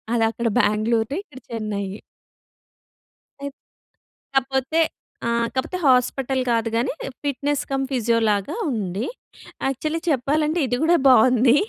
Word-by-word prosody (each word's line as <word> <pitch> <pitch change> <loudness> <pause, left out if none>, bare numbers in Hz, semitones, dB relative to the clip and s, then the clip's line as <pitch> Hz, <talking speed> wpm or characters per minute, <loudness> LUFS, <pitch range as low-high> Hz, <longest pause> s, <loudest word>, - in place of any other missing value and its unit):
అదక్కడ 225 +1 +1
బెంగళూరు 220 +4 +1
ఇక్కడ 260 - -13
చెన్నయి. 210 -3 -3 1.4
అయ్ 280 0 -4 0.8
కాపోతే 270 +4 +1 0.5
ఆ! - - +1 0.3
కాపోతే 265 +8 -2
హాస్పిటల్ 260 +1 +2
కాదు 230 -1 +1
గానీ, 240 +4 0 0.3
ఫిట్‍నెస్ 285 +1 0
కమ్ 270 0 0
ఫిజియోలాగ 225 -4 +1 0.2
ఉంది. 205 -1 -2 0.6
యాక్చువలీ 305 +5 -1
చెప్పాలంటే, 300 +3 +1
ఇది 245 0 0
గూడా 340 +2 +5
బావుంది. 250 0 +6
250 Hz, 105 wpm, -23 LUFS, 225-275 Hz, 1.4 s, బావుంది